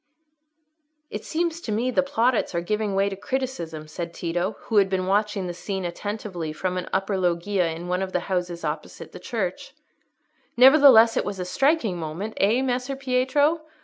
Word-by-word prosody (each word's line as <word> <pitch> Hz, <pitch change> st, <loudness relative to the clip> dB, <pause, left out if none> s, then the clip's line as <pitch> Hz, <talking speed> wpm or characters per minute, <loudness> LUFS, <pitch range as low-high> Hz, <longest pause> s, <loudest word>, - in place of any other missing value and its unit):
"It -, -, -6 dB
seems 335 Hz, 0 st, -2 dB
to 220 Hz, -, -5 dB
me 235 Hz, +4 st, 0 dB
the 265 Hz, -, +3 dB
plaudits 250 Hz, -7 st, 0 dB
are 170 Hz, -, 0 dB
giving 210 Hz, +2 st, -1 dB
way 195 Hz, +1 st, +2 dB
to 200 Hz, -, -3 dB
criticism," 190 Hz, -10 st, -4 dB
said 170 Hz, +2 st, -6 dB
Tito, 175 Hz, +4 st, -2 dB
who 220 Hz, -, -1 dB
had 195 Hz, -1 st, +5 dB
been 185 Hz, -1 st, -1 dB
watching 200 Hz, 0 st, 0 dB
the 175 Hz, -, -4 dB
scene 190 Hz, +1 st, -4 dB
attentively 180 Hz, -2 st, -4 dB
from 180 Hz, +4 st, -3 dB
an 180 Hz, -, -4 dB
upper 195 Hz, 0 st, 0 dB
loggia 180 Hz, +1 st, +1 dB
in 165 Hz, +2 st, -6 dB
one 180 Hz, +1 st, -1 dB
of 190 Hz, -1 st, -3 dB
the 180 Hz, -, 0 dB
houses 175 Hz, -2 st, -3 dB
opposite -, -, -5 dB
the -, -, -10 dB
church. -, -, -4 dB, 0.8 s
"Nevertheless 255 Hz, -4 st, +7 dB
it -, -, +2 dB
was 200 Hz, -1 st, -4 dB
a 180 Hz, -, -3 dB
striking 235 Hz, -, +1 dB
moment, 170 Hz, +7 st, -5 dB
eh, 225 Hz, +6 st, +2 dB
Messer 255 Hz, +1 st, -1 dB
Pietro? 270 Hz, +4 st, +1 dB
200 Hz, 180 wpm, -24 LUFS, 180-250 Hz, 0.8 s, Nevertheless